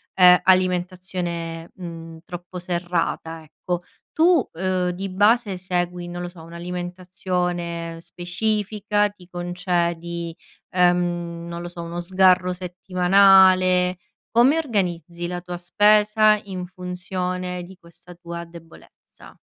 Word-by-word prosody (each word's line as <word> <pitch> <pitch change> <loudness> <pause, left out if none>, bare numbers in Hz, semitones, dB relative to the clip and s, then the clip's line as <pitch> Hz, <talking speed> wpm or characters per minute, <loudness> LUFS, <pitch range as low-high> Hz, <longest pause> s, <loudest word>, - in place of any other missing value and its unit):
ehm, 180 -1 +8
alimentazione, 180 -2 0
mhmm, 165 -2 -9
troppo 175 +1 -8
serrata, 170 -2 -2
ecco. 170 +3 -4 0.3
Tu, 330 -4 +4
uhm, 185 +1 0
di 190 +2 -5
base 205 +1 +2
segui, 180 -1 -2
non 175 0 -6
lo 175 - -4
so, 175 -2 -14
un'alimentazione 175 -1 -4
specifica? 205 +4 -1
Ti 190 -3 -18
concedi, 170 -2 -2 0.4
ehm, 175 -2 +1
non 170 0 -6
lo 175 - -6
so, 175 -1 -8
uno 170 +1 -5
sgarro 185 0 +3
settimanale? 185 0 +4 0.3
Come 250 +7 +5
organizzi 175 - -2
la 175 0 -4
tua 180 0 -6
spesa 210 +3 +4
in 185 -2 -5
funzione 180 0 -4
di 185 +1 -13
questa 170 0 -16
tua 170 0 -7
debolezza? 165 -1 -16
180 Hz, 110 wpm, -23 LUFS, 175-185 Hz, 0.4 s, ehm